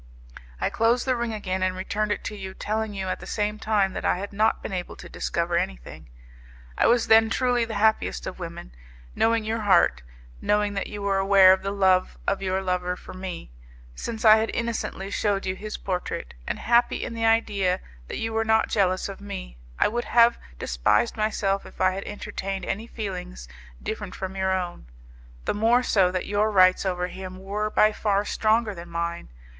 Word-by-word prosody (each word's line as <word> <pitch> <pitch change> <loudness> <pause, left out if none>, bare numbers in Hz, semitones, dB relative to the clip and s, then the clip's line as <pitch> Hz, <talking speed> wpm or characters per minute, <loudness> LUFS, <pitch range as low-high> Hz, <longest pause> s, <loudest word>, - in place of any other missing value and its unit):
I - - 0
closed 230 +2 +2
the 260 -1 +2
ring 235 -1 -2
again 190 -3 -3
and 185 0 0
returned 205 +3 -2
it - - -2
to 210 - -5
you, 190 -2 -7
telling 215 0 -2
you 190 -1 -3
at 185 - -2
the - - -10
same 210 0 -2
time 205 -4 +1
that - - -5
I - - +2
had 200 +2 -6
not 215 +2 +1
been - - -5
able 180 -1 -4
to 175 - -11
discover 170 0 -2
anything. - - -5 0.7
I - - +3
was 235 0 +4
then 225 0 +6
truly 245 0 +1
the 225 -1 -6
happiest 205 - +1
of - - -6
women. - - -7 0.4
Knowing 225 0 +2
your 220 +1 -2
heart, 190 - +3 0.4
knowing 210 0 +1
that 195 - -2
you 205 -1 -7
were 195 -1 +1
aware 195 -1 +7
of 190 - -1
the 195 - -3
love 190 -2 +2
of 195 - 0
your 190 0 -1
lover 180 -1 -1
for - - -11
me, 185 - -7 0.4
since 220 - -5
I 215 0 +9
had 220 +1 0
innocently 230 -4 -3
shewed 200 -2 0
you 185 0 -1
his 215 +2 -6
portrait, 180 -2 -4
and - - -2
happy 240 +1 +2
in 230 - -5
the 225 0 0
idea 200 -5 +2 0.3
that - - -5
you 225 0 -3
were 225 0 +1
not 220 0 +2
jealous 185 -3 +1
of 195 0 -8
me, - - -7 0.2
I - - +4
would 240 +3 -2
have 235 0 +4 0.2
despised - - +1
myself 205 -3 0
if - - -14
I 185 0 +4
had 195 +1 -5
entertained 195 -2 -5
any 220 +4 -3
feelings 180 - -6 0.4
different 210 -3 -5
from 190 0 -5
your 190 0 0
own, 180 - -3 0.6
the - - 0
more 230 +4 +3
so 190 -6 +3
that 185 0 -2
your 205 +1 +1
rights 185 -1 +4
over 180 -1 -1
him 185 0 -7
were 205 +3 -3
by 215 0 +4
far 205 -1 0
stronger 220 0 +1
than 170 -1 -10
mine. 170 - -3
200 Hz, 200 wpm, -25 LUFS, 185-220 Hz, 0.7 s, I